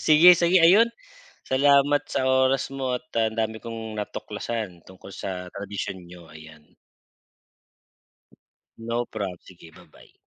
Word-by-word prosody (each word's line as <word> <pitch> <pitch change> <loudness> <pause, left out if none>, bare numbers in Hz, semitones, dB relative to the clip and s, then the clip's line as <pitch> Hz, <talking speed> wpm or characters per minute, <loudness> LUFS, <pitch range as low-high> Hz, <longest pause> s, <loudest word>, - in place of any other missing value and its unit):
sige 155 +3 +7
sige. 175 +2 +3
Ayun, 210 +7 +6 0.6
salamat 140 +1 +4
sa - - -1
oras 130 0 +2
mo 130 -2 -1
at - - -30
ang 110 0 0
dami 110 0 -1
kong 115 -1 -7
natuklasan 105 +1 -5 0.2
tungkol 95 +1 -13
sa 90 -2 -6
tradisyon 100 -1 -5
niyo 85 0 -14
ayan. 80 -1 -15 2.0
No 115 +1 -3
prob, 95 -4 -4
sige 85 -3 -15
ba-bye. - - -19
115 Hz, 125 wpm, -24 LUFS, 95-135 Hz, 2.0 s, sige